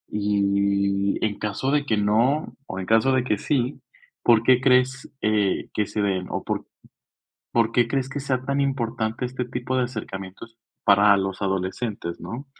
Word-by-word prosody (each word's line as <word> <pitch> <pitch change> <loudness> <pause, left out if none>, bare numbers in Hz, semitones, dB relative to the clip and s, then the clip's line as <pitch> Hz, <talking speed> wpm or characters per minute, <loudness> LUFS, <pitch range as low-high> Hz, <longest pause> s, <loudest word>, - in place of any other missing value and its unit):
y, 100 -1 +1
en 105 -2 -3
caso 105 +6 -2
de 145 -1 +1
que 110 -6 +1
no, 115 +9 +1
o 95 - -5
en 95 - -4
caso 115 +6 +3
de 130 -1 +2
que 110 -4 0
sí, 130 -2 -1 0.4
¿por 115 -2 +5
qué 130 +1 +5
crees, 130 +1 +2
eh, 105 -3 +1
que 105 - 0
se 105 - -2
den? 95 -2 -1
¿O - - -3
por, - - -3 0.9
por 115 -1 +2
qué 120 0 +3
crees 135 +1 -1
que 145 - -4
sea 130 -2 -1
tan 140 +1 -1
importante 120 -3 -1
este 125 0 -4
tipo 125 +1 -3
de 130 - +2
acercamientos 110 -1 -8 0.3
para 100 0 +6
los 95 0 -3
adolescentes, 95 -1 -3
no? 125 +5 -7
115 Hz, 170 wpm, -24 LUFS, 100-130 Hz, 0.9 s, para